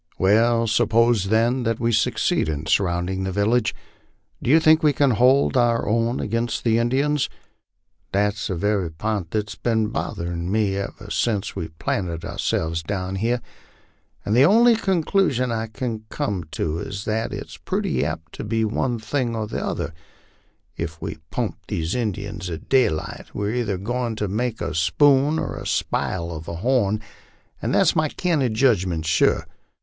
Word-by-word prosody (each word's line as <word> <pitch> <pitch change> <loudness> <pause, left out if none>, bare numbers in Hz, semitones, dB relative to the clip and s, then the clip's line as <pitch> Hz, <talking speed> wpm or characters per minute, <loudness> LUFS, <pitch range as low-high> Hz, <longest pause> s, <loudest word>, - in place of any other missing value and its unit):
" - - -40
"Well, 115 +4 +3
suppose 115 -1 +3
then 115 +5 +2
that 115 -1 -1
we 115 0 +1
succeed 105 -6 +1
in 75 0 -3
surrounding 90 +1 0
the 95 - -2
village, 105 +4 +1 0.7
do - - -2
you 155 +4 +7
think 155 0 +5
we 150 -2 +4
can 140 0 +3
hold 130 +5 +4
our 120 -2 +2
own 115 +3 +1
against 115 +2 -2
the 115 -1 +3
Indians?" 135 +5 +1 0.8
"That's 100 +1 0
the 95 - -2
very 100 -1 0
pint 95 +2 -3
that's 105 0 -2
been 110 0 0
botherin' 85 -7 -3
me 105 -2 +1
ever 100 +1 -6
since 105 -3 0
we 80 - -3
planted 85 +1 -3
ourselves 80 0 -1
down 95 +2 -3
here, 120 +4 0 0.8
and 105 - +1
the 125 - +6
only 230 +8 +6
conclusion 175 - +1
I 115 0 -2
kin 110 0 -5
come 95 -5 -2
at - - -8
is 85 +6 -3
that 110 +1 -1
it's - - -7
purty 65 - -1
apt 80 +2 -4
to - - -6
be 115 -1 0
one 120 +3 -1
thing 120 +1 -2
or 110 -1 -2
t'other; 85 - -3 0.8
if 80 -1 -4
we 80 - -6
pump 105 -4 -3
these 85 -5 -2
Injuns 100 -4 -3
at 80 -2 -7
daylight, 120 - 0
we're 105 +1 -1
either 115 -6 -1
goin' 120 +3 -2
to 105 -1 -2
make 115 +4 -2
a - - -2
spoon 135 - +3
or - - -3
spile 85 -2 -1
a 80 - -5 0.2
horn, 110 +1 +1 0.6
an' - - -1
that's - - +4
my 155 -1 +2
candid 145 -12 0
judgment, 95 -10 +2
sure. 80 - +2
110 Hz, 160 wpm, -23 LUFS, 95-120 Hz, 0.8 s, you